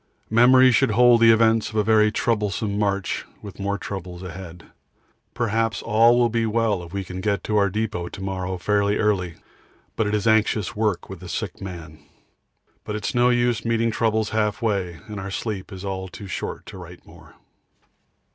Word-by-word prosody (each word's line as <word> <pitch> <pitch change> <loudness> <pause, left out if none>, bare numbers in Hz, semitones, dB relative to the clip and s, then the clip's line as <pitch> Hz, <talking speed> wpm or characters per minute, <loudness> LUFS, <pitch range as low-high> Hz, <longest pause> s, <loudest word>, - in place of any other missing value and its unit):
Memory 130 +3 +6
should 115 - +3
hold 120 +2 +5
the 115 - +7
events 115 0 +3
of 110 - -11
a 105 - +2
very 110 0 +4
troublesome 105 -2 -1
march 100 -2 -1 0.2
with 100 -2 -10
more 100 0 -1
troubles 95 -2 -7
ahead. 90 -1 -9 0.7
Perhaps 115 -2 -1
all 115 +3 +4
will 120 -1 +4
be 115 0 0
well 110 -3 0
if 85 -1 -11
we 100 0 -3
can 95 0 -7
get 100 0 -1
to 105 - 0
our 100 -1 +3
depot 105 -4 -3
to - - -10
morrow 95 -1 -3
fairly 100 +2 +1
early, 95 -6 0 0.6
but 110 - 0
it 105 - 0
is 105 - -2
anxious 110 -3 +2
work 105 -4 -1
with - - -9
the - - -10
sick - - -5
man. 85 -5 -8 0.8
But 105 - -5
it's 105 -2 -3
no 120 0 +3
use 120 -2 +1
meeting 115 0 +1
troubles 110 -1 0
half 105 -1 0
way, 95 -7 -2
and 105 -2 -7
our 95 0 -5
sleep 100 0 -5
is 95 0 -8
all 95 -1 -4
too 100 +2 -10
short 95 - -5
to - - -10
write - - -12
more. - - -17
105 Hz, 185 wpm, -23 LUFS, 95-115 Hz, 0.8 s, the